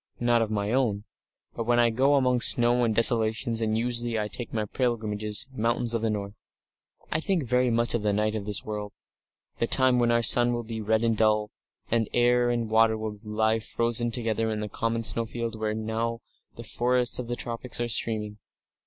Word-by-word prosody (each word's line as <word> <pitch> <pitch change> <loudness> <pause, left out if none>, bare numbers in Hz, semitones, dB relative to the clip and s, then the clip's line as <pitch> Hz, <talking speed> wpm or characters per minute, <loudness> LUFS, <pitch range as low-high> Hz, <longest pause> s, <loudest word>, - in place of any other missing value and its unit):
"Not 120 -1 +2
of 110 - -1
my 105 -1 -2
own. 115 -6 0 0.5
But 115 - -4
when 120 +1 +2
I 120 -1 +4
go 135 +5 +2
among 125 -3 +2
snows 120 +1 +4
and 110 -2 -1
desolations 115 0 +3
and 110 0 0
usually 120 0 0
I 105 0 -3
take 120 +4 -7
my 110 -2 -2
pilgrimage 110 -3 -2
in 105 - -3 0.2
mountains 120 0 -1
or 115 - 0
the 110 0 -1
north 100 -1 -4 0.8
I - - +1
think 175 -1 -1
very 125 0 +1
much 115 0 +1
of 120 - -1
the 105 0 0
Night 105 +1 0
of 105 -2 -5
this 105 -1 0
World 105 -1 -5 0.7
the 115 - +1
time 130 -1 +3
when 120 -1 +2
our 120 0 +2
sun 120 +2 +5
will 120 0 -3
be 110 0 -6
red 110 +1 0
and 115 -1 +1
dull, 105 -1 +1 0.4
and 115 -2 +1
air 120 0 +3
and 120 -1 -1
water 110 0 +3
will 110 -1 -5
lie 110 +1 0
frozen 120 +1 -1
together 115 -1 -1
in 105 -1 -3
a 105 - -5
common 115 +2 -2
snowfield 115 +2 -1
where 110 -1 -3
now 115 +1 -3 0.3
the 120 - -9
forests 125 +2 0
of 125 - -5
the 120 - -3
tropics 120 +1 -5
are 120 - -1
steaming.... 110 -2 -2
115 Hz, 205 wpm, -26 LUFS, 110-120 Hz, 0.8 s, sun